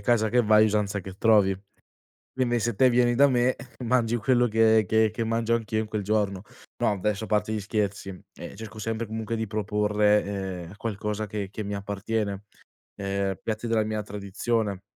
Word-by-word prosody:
"casa 110 +1 +2
che 125 0 +4
vai 110 0 +5
usanza 105 -1 0
che 95 +1 -8
trovi." 105 -4 +4 0.8
Quindi 120 -2 +1
se 115 +1 0
te 130 +4 +5
vieni, 120 0 +3
eh, 120 - 0
da 140 +2 +6
me 125 0 +2 0.3
mangi 120 -1 +2
quello 120 +2 +2
che 110 0 +4
che 110 +2 +3
che 115 - -3
mangio 115 +1 +1
anch'io 110 -1 -2
in 110 - -2
quel 105 -2 -3
giorno. 100 -2 0 0.4
No - - +3
adesso 105 +2 -1
a - - -12
parte 105 0 0
gli 105 - -2
scherzi, 100 -1 -2
ehm, 90 - -10
cerco 110 -1 -9
sempre 115 +1 -3
comunque 110 +1 -3
di 110 -1 -2
proporre, 105 0 +2 0.4
ehm, 85 - -11
qualcosa 105 -1 -3
che 100 -1 -4
che 105 +1 -6
mi 100 0 -4
appartiene, 100 0 -3 0.5
ehm, 100 -1 -2
piatti 110 +1 -3
della 110 -2 +1
mia 110 0 -2
tradizione. 105 0 -2
110 Hz, 185 wpm, -26 LUFS, 100-115 Hz, 0.8 s, da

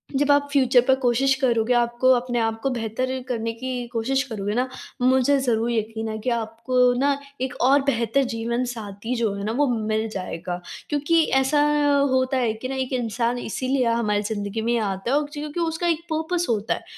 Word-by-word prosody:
जब 290 +1 +3
आप 285 0 +3
फ्यूचर 260 -3 +4
पर 265 - +5
कोशिश 250 +3 +3
करोगे, 240 -2 +2
आपको 240 +1 +2
अपने 245 -1 0
आप 225 0 -1
को 270 - 0
बेहतर 255 +2 -2
करने 230 -2 -2
की 250 +1 -4
कोशिश 255 +4 0
करोगे 210 -6 -4
ना, 250 +2 +1 0.3
मुझे 260 +2 +4
ज़रूर 235 -3 0
यकीन 220 0 -2
है 220 - -4
कि 225 - -2
आपको 235 +2 +1
ना 280 +1 +2 0.2
एक 260 0 -2
और 275 +3 +5
बेहतर 240 -1 +1
जीवनसाथी 230 -1 -3
जो 230 -4 0
है 200 - -5
ना, 215 - -1
वो 285 +5 +2
मिल 220 -2 -1
जाएगा। 180 -3 -5 0.3
क्योंकि 305 +3 +2 0.2
ऐसा 270 +3 +2 0.5
होता 260 +1 +1
है 240 -4 +1
कि 220 +4 -6
ना 270 - -3
एक 265 0 -3
इंसान 240 0 -1
इसीलिए 255 +3 -1
हमारी 230 -3 +1
ज़िंदगी 205 0 -3
में 235 +1 +1
आता 195 +1 -2
है 280 - +4
उकची 295 0 -6
क्योंकि 300 +3 -5
उसका 330 +1 -1
एक 330 -1 +1
पर्पस 335 +3 -1
होता 220 -2 0
है - - -7
245 Hz, 190 wpm, -23 LUFS, 225-265 Hz, 0.5 s, पर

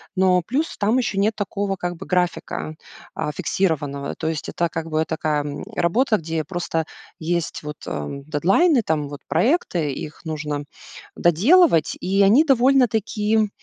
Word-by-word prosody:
но 185 -2 +3
плюс 290 +7 -2
там 220 +5 +2
ещё 215 -5 -2
нет 215 +2 +2
такого, 200 -1 -2
как 175 0 -3
бы, - - -9
графика, 180 -3 -1 0.4
а, 150 - -2
фиксированного. 145 -4 -1
То 160 - -2
есть 160 -1 -3
это, 170 -1 -1
как 165 0 -4
бы, 155 0 +1
такая, 155 -2 -1
м, 145 -1 -5
работа, 220 +6 +2
где 165 0 -6
я 155 - -1
просто 165 -2 -2 0.3
есть 165 -1 -2
вот, 150 0 -6
ам, 105 - -5
дедлайны, 205 - +3
там, 150 -6 -1
вот 145 -1 -8
проекты, 175 - +1
их 155 +5 -8
нужно 150 -2 -3 0.5
доделывать, 180 - +4
и 195 +2 +1
они 220 +10 +6
довольно-таки, 225 -5 +2
175 Hz, 155 wpm, -22 LUFS, 155-215 Hz, 0.5 s, они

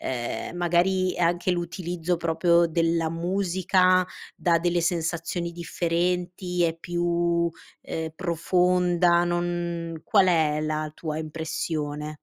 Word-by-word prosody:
ehm 125 +6 -4
magari 180 +2 +1
anche 175 +1 +1
l'utilizzo 175 0 -2
proprio 170 +1 +3
della 165 0 +1
musica 185 +1 +2 0.3
dà 170 -1 +2
delle 175 0 +1
sensazioni 170 0 -2
differenti, 175 +1 -1
è 165 -1 +2
più, 170 0 0 0.3
ehm, 160 0 -4
profonda, 175 0 +2
non 175 -1 -2
qual 200 -3 +4
è 155 -4 +2
la 155 0 -2
tua 155 -2 -4
impressione? 155 -1 -4
170 Hz, 105 wpm, -25 LUFS, 165-180 Hz, 0.3 s, qual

